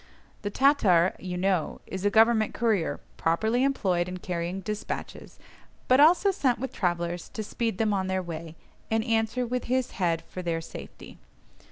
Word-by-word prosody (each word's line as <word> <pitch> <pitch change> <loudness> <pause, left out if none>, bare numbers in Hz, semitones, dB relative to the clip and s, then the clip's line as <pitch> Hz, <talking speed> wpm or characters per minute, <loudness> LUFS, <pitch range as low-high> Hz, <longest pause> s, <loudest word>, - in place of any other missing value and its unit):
The 205 - -2
Tatar, 205 - +4
you 180 -1 -5
know, 185 -3 0
is 190 0 -6
a 205 - +4
government 220 0 +4
courier 215 -7 0 0.2
properly 220 +10 +1
employed 185 -10 +1
in 185 - -5
carrying 175 +1 -3
despatches, 210 +1 -6 0.5
but 255 +1 +5
also 350 +6 +6
sent 260 -10 +1
with 260 +2 -5
travellers 175 -1 -2
to 215 - -5
speed 225 -1 -2
them 215 -1 +1
on 190 -1 0
their 190 0 -1
way, 165 -1 -7 0.3
and 225 0 +1
answer 225 +1 0
with 250 +1 -3
his 255 0 0
head 165 -2 +1
for 185 - -6
their 170 -2 -1
safety. 165 - -10
205 Hz, 165 wpm, -27 LUFS, 175-235 Hz, 0.5 s, also